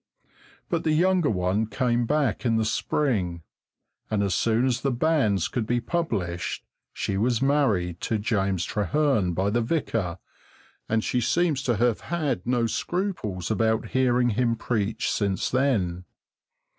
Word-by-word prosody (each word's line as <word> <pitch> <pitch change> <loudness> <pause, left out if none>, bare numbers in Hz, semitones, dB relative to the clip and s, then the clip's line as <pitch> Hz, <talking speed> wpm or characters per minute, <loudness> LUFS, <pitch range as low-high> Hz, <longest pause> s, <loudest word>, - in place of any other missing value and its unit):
But 170 -2 -1
the 155 - +2
younger 180 0 +3
one 95 +2 0
came 120 -1 0
back 145 -8 0
in 115 -3 +2
the 110 - +1
spring, 100 - -1 0.7
and 105 -2 +1
as 100 -2 0
soon 115 +5 +2
as 125 -2 0
the 140 - +1
banns 120 - +1
could 115 -4 -3
be 120 0 +1
published 110 - -2 0.3
she 95 - -2
was 115 +2 +1
married 110 - +1
to 110 - 0
James 100 -4 0
Trehearn 105 - +1
by 95 +3 +1
the 120 +2 +1
vicar, 115 - -1 0.7
and 110 0 +1
she 125 - 0
seems 160 +2 +1
to 120 - +2
have 120 0 +2
had 145 - -2
no 120 -1 +2
scruples 115 - -2
about 110 +1 +1
hearing 125 -1 +2
him 115 +1 +1
preach 110 -1 -1
since 100 -3 -1
then. 100 -10 0
115 Hz, 145 wpm, -25 LUFS, 100-135 Hz, 0.7 s, younger